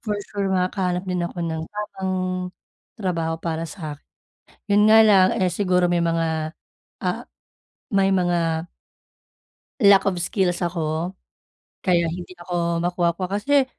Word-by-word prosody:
For 210 Hz, -2 st, -2 dB, 0.2 s
sure, 200 Hz, -1 st, -1 dB
makakahanap 185 Hz, -1 st, 0 dB
din 180 Hz, -1 st, -2 dB
ako 170 Hz, +1 st, -4 dB
ng 160 Hz, -1 st, -3 dB
tamang 205 Hz, -2 st, -4 dB, 0.9 s
trabaho 165 Hz, -5 st, -1 dB
para 165 Hz, 0 st, -3 dB
sa'kin. 155 Hz, -4 st, -7 dB, 0.7 s
Yun 210 Hz, +1 st, +5 dB
nga 220 Hz, 0 st, +8 dB
lang 195 Hz, -3 st, +6 dB
eh, 185 Hz, -2 st, +1 dB
siguro 180 Hz, -1 st, +2 dB
may 175 Hz, -, +2 dB
mga, 165 Hz, -1 st, -1 dB, 0.4 s
ah, -, -, -2 dB, 0.7 s
may 195 Hz, -1 st, +3 dB
mga 175 Hz, -4 st, +1 dB, 1.2 s
Lack 200 Hz, -1 st, +6 dB
of 195 Hz, -, +2 dB
skills 180 Hz, -1 st, 0 dB
ako, 165 Hz, 0 st, -1 dB, 0.7 s
kaya 175 Hz, -2 st, +2 dB
hindi 180 Hz, +1 st, -8 dB
ako 175 Hz, -1 st, -2 dB
makuha-kuha 175 Hz, 0 st, 0 dB
kasi 285 Hz, +3 st, +3 dB
180 Hz, 125 wpm, -23 LUFS, 170-195 Hz, 1.2 s, nga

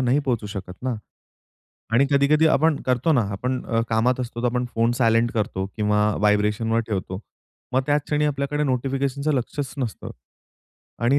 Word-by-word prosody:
नाही 130 Hz, +2 st, +2 dB
पोहचू 125 Hz, -7 st, -1 dB
शकत 100 Hz, -3 st, -6 dB
ना. 130 Hz, -1 st, -1 dB, 1.0 s
आणि 135 Hz, +4 st, +4 dB
कधी-कधी 145 Hz, +3 st, +4 dB
आपण 155 Hz, +1 st, +3 dB
करतो 130 Hz, +6 st, +2 dB
ना 125 Hz, -5 st, +3 dB
आपण 125 Hz, +6 st, -2 dB
अ, 115 Hz, 0 st, +1 dB
कामात 120 Hz, +3 st, +2 dB
असतो 120 Hz, -1 st, -5 dB
तर, -, -, +2 dB
आपण 125 Hz, +1 st, 0 dB
फोन 115 Hz, +1 st, +2 dB
सायलंट 115 Hz, -1 st, +3 dB
करतो 100 Hz, -3 st, -2 dB
किंवा 105 Hz, -1 st, +2 dB, 0.2 s
वायब्रेशनवर 105 Hz, +2 st, +2 dB
ठेवतो. 95 Hz, -2 st, -3 dB, 0.5 s
मग 130 Hz, -, +2 dB
त्याच 145 Hz, 0 st, +2 dB
क्षणी 150 Hz, 0 st, 0 dB
आपल्याकडे 145 Hz, +1 st, -1 dB
नोटिफिकेशनचं 135 Hz, +2 st, -1 dB
लक्षच 130 Hz, +1 st, -3 dB
नसतं 120 Hz, -5 st, -4 dB, 0.9 s
आणि 135 Hz, +4 st, +4 dB
125 Hz, 155 wpm, -23 LUFS, 115-140 Hz, 1.0 s, आणि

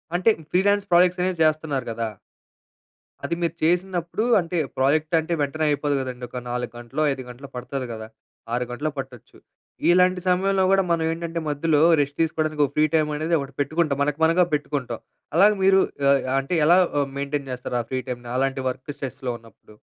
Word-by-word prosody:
అంటే 185 Hz, +5 st, +3 dB, 0.2 s
freelance 200 Hz, +2 st, +2 dB
projects 180 Hz, +1 st, +4 dB
అనేవి 180 Hz, -2 st, -1 dB
చేస్తున్నారు 155 Hz, -4 st, 0 dB
గదా! 115 Hz, -1 st, -3 dB, 1.1 s
అది 170 Hz, -, -1 dB
మీరు 170 Hz, -1 st, 0 dB
చేసినప్పుడు, 175 Hz, +2 st, 0 dB, 0.2 s
అంటే 175 Hz, 0 st, -3 dB, 0.2 s
ప్రాజెక్ట్ 155 Hz, +5 st, +2 dB
అంటే 160 Hz, +2 st, -3 dB
వెంటనే 155 Hz, +2 st, -1 dB
అయిపోదు 145 Hz, 0 st, 0 dB
గదండీ. 125 Hz, -1 st, -6 dB
ఒక 125 Hz, -, -5 dB
4 125 Hz, -1 st, -3 dB
గంటలో, 120 Hz, +5 st, -4 dB
5 135 Hz, -1 st, -4 dB
గంటలో 130 Hz, +3 st, -10 dB
పడతది 125 Hz, +1 st, -4 dB
గదా! 110 Hz, -1 st, -7 dB, 0.5 s
6 125 Hz, +1 st, 0 dB
గంటలు 145 Hz, +5 st, -2 dB
పట్టొచ్చు. 130 Hz, -4 st, -8 dB, 0.5 s
ఇలాంటి 180 Hz, +1 st, +4 dB
సమయంలో 190 Hz, +1 st, +2 dB
గూడా 195 Hz, 0 st, +4 dB
మనం 165 Hz, -1 st, +1 dB
ఏంటంటే, 165 Hz, 0 st, -4 dB
మధ్యలో 150 Hz, +1 st, +1 dB, 0.2 s
రెస్ట్ 140 Hz, 0 st, -3 dB
తీసుకోవడానికి 155 Hz, -2 st, 0 dB
ఓ -, -, -2 dB
ఫ్రీ 155 Hz, 0 st, +4 dB
టైమ్ 155 Hz, -1 st, +2 dB
అనేది 165 Hz, +2 st, 0 dB
ఒకటి 140 Hz, 0 st, -6 dB
పెట్టుకుంటాం. 155 Hz, 0 st, 0 dB
మనకు 145 Hz, +1 st, -2 dB
మనగా 170 Hz, +2 st, +4 dB
పెట్టుకుంటాం. 140 Hz, -5 st, -4 dB, 0.4 s
అలాగే 210 Hz, +3 st, +6 dB
మీరు 190 Hz, 0 st, +6 dB, 0.3 s
ఆహ్, 140 Hz, 0 st, +4 dB, 0.2 s
అంటే 135 Hz, +6 st, -4 dB
ఎలా 175 Hz, +3 st, +6 dB, 0.2 s
ఆహ్, 140 Hz, -, -1 dB
మెయింటైన్ 140 Hz, 0 st, -3 dB
జేస్తారు 125 Hz, 0 st, -3 dB
ఆ -, -, -6 dB
ఫ్రీ 130 Hz, 0 st, -1 dB
టైమ్‌ని 120 Hz, -1 st, -6 dB
అలాంటి 135 Hz, 0 st, 0 dB
వర్క్ 130 Hz, +3 st, -6 dB
స్ట్రెస్‌లో 130 Hz, -1 st, -4 dB
ఉన్నప్పుడు? 110 Hz, -1 st, -19 dB
150 Hz, 170 wpm, -23 LUFS, 130-170 Hz, 1.1 s, అలాగే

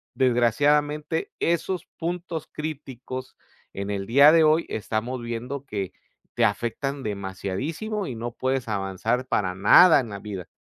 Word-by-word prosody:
desgraciadamente 145 Hz, +6 st, +1 dB
esos 170 Hz, +2 st, 0 dB
puntos 170 Hz, -1 st, -4 dB
críticos, 130 Hz, -4 st, -6 dB, 0.4 s
en 100 Hz, +1 st, -4 dB
el 100 Hz, -1 st, -3 dB
día 140 Hz, +5 st, +7 dB
de 165 Hz, -1 st, +5 dB
hoy 155 Hz, +2 st, +4 dB
estamos 115 Hz, +4 st, -3 dB
viendo 120 Hz, +4 st, -5 dB
que, 100 Hz, -7 st, -4 dB, 0.4 s
te 120 Hz, -, +3 dB
afectan 120 Hz, +6 st, -2 dB
demasiadísimo 105 Hz, -, -4 dB
y 130 Hz, -, -4 dB
no 115 Hz, +1 st, -5 dB
puedes 130 Hz, +1 st, -2 dB
avanzar 105 Hz, +4 st, -1 dB
para 95 Hz, -7 st, -1 dB
nada 145 Hz, -, +7 dB
en 120 Hz, -4 st, -4 dB
la 100 Hz, -1 st, -6 dB
vida. 95 Hz, -5 st, -7 dB
125 Hz, 135 wpm, -25 LUFS, 105-150 Hz, 0.4 s, día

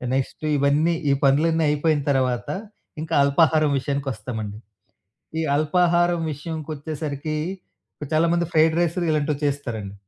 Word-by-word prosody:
Next 135 Hz, +3 st, -3 dB
ఇవన్నీ 145 Hz, +4 st, +2 dB, 0.2 s
ఈ -, -, +5 dB
పనులన్నీ 160 Hz, +4 st, +3 dB
అయిపోయిన 150 Hz, 0 st, +1 dB
తర్వాత 125 Hz, -3 st, 0 dB, 0.5 s
ఇంకా 160 Hz, +1 st, -5 dB
అల్పాహారం 155 Hz, +1 st, +3 dB
విషయానికొస్తామండి. 120 Hz, -6 st, -4 dB, 0.8 s
ఈ -, -, 0 dB
అల్పాహారం 175 Hz, +2 st, +2 dB
విషయంకొచ్చేసరికి 155 Hz, -1 st, -5 dB, 0.8 s
చాలామంది 170 Hz, +2 st, +2 dB
ఫ్రైడ్ 160 Hz, 0 st, +4 dB
రైసులు 175 Hz, +1 st, -1 dB
ఇలాంటివి 150 Hz, -1 st, -1 dB
చేస్తారండి. 115 Hz, -8 st, -4 dB
150 Hz, 100 wpm, -23 LUFS, 140-160 Hz, 0.8 s, ఈ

